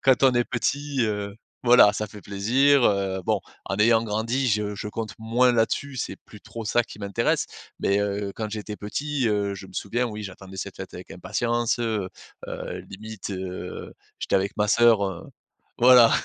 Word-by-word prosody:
quand 135 0 +4
on 130 - +6
est 120 - +3
petit, 140 +4 -1
heu, 105 -2 -2 0.3
voilà, 120 -4 +7
ça 105 0 -3
fait 105 -1 -12
plaisir, 125 +7 +3
heu, 95 -2 +1
bon, - - +1 0.3
en 100 - -2
ayant 115 +1 +5
grandi, 115 +5 0
je 105 -1 0
je 105 - -5
compte 110 0 -4
moins 120 +3 +3
là-dessus, 125 +4 0
c'est - - -3
plus 105 - -13
trop 115 -1 -8
ça 120 +3 +2
qui - - -12
m'intéresse. 100 -1 0 0.3
Mais 100 +1 +2
heu, 100 -1 -2
quand 110 -1 -3
j'étais 105 0 -5
petit, 140 +5 -2
heu, 100 -1 0
je 95 0 -9
me - - -15
souviens, 120 +5 -1
oui, 105 -2 -6
j'attendais 95 0 -9
cette - - -5
fête - - -8
avec - - -10
impatience. 115 +6 -1
Heu 110 -5 -1 0.4
heu, - - -5
limite 110 0 -7
heu, 95 -1 -6 0.3
j'étais - - +1
avec 95 +1 -1
ma 105 0 +1
sœur 115 -2 +5
heu, 95 -3 -6 0.6
voilà. 125 -1 +8
105 Hz, 185 wpm, -25 LUFS, 100-120 Hz, 0.6 s, voilà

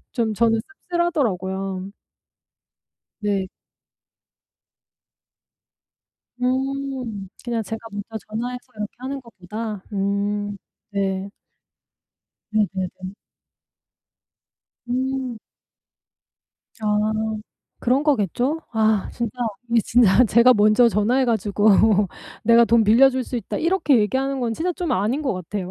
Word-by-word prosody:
좀 225 -4 0
저는 225 0 +2 0.3
씁쓸하더라고요. 195 - -1 1.3
네. 200 -2 0 3.0
음. 260 -5 -2 0.2
그냥 235 -2 -1
제가 225 +2 -5
먼저 205 +2 -6
전화해서 245 +3 -4
이렇게 210 0 -4
하는 270 +2 -5
것보다? 215 -2 -7
음 205 +1 -1 0.3
네. 195 -1 -1 1.2
네네네. 190 -2 -2 1.7
음. 260 -1 -2 1.4
아 215 - -3 0.9
그런 255 +3 +2
거겠죠? 275 - +1
아 220 -2 +2
진짜 235 -3 -3 0.4
이 230 0 +4
진짜 240 +1 +5
제가 235 +3 +6
먼저 215 +3 +5
전화해 235 +5 +2
가지고 210 -2 +1 0.7
"내가 230 +1 +6
돈 230 0 +4
빌려줄 255 +4 +5
수 250 - -4
있다." 225 - -4
이렇게 325 -7 +3
얘기하는 265 +5 0
건 235 -2 -1
진짜 355 +8 -1
좀 350 -2 -3
아닌 225 +11 0
것 265 - 0
같아요. 185 +1 -5
225 Hz, 195 characters per minute, -22 LUFS, 205-255 Hz, 3.0 s, 제가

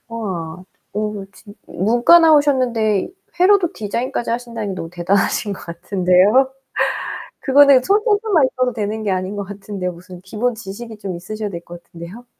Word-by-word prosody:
우와. 185 -6 -5 0.3
오 210 -1 -3
진 205 -2 -15
문과 240 - +4
나오셨는데 255 - +3 0.3
회로도 370 -1 +4
디자인까지 235 +3 -3
하신다니 230 -4 -4
너무 165 -3 -6
대단하신 195 +4 0
것 195 - -8
같은데요. 185 +8 +2 0.9
그거는 275 -1 +5
손재주만 415 - +2
있어도 255 -1 0
되는 215 0 -3
게 205 - 0
아닌 185 +2 -2
것 200 - -3
같은데요. 195 -2 -5
무슨 180 +1 -13
기본 225 +5 -2
지식이 220 +2 -9
좀 195 -3 -5
있으셔야 210 +5 -5
될 170 -3 -7
것 175 0 -11
같은데요. 175 +8 -11
210 Hz, 350 characters per minute, -19 LUFS, 185-250 Hz, 0.9 s, 그거는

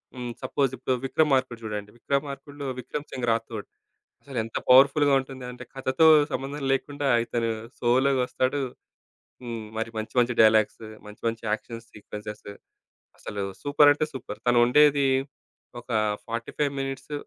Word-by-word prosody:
హ్మ్. 125 -1 -5
సపోజ్ 135 0 0
ఇప్పుడు 130 +1 0
'విక్రమార్కుడు' 130 -5 +1
జూడండి. 105 -1 -5
'విక్రమార్కుడు‌లో 140 +2 -3
విక్రమ్ 145 +4 -6
సింగ్ 125 -2 -3
రాథోడ్' 115 -2 -3 0.6
అసలెంత 115 -5 -4
పవర్‌ఫుల్‌గా 140 +2 +6
ఉంటుందంటే 125 -2 -8
కథతో 135 +4 +3 0.2
సంబంధం 140 +2 -4
లేకుండా 145 +1 -2 0.2
ఇతను 115 -1 -1 0.3
సోలోగొస్తాడు. 130 +2 +1 0.8
హ్మ్. 115 -2 -5
మరి 115 0 -2
మంచి 110 - -6
మంచి 120 0 +1
డైలాగ్స్, 110 0 +4 0.3
మంచి 105 - -14
మంచి 115 0 -5
యాక్షన్స్ 115 +1 -4
సీక్వెన్సెస్, 105 0 -9 0.7
అసలు 100 -1 -5 0.2
సూపరంటే 145 +1 +4
సూపర్. 130 -1 -7
తనుండేది 135 +4 +5 0.7
ఒక 120 - -17 0.4
45 120 +5 -2
మినిట్స్ 135 +2 -5
130 Hz, 115 wpm, -26 LUFS, 115-140 Hz, 0.8 s, పవర్‌ఫుల్‌గా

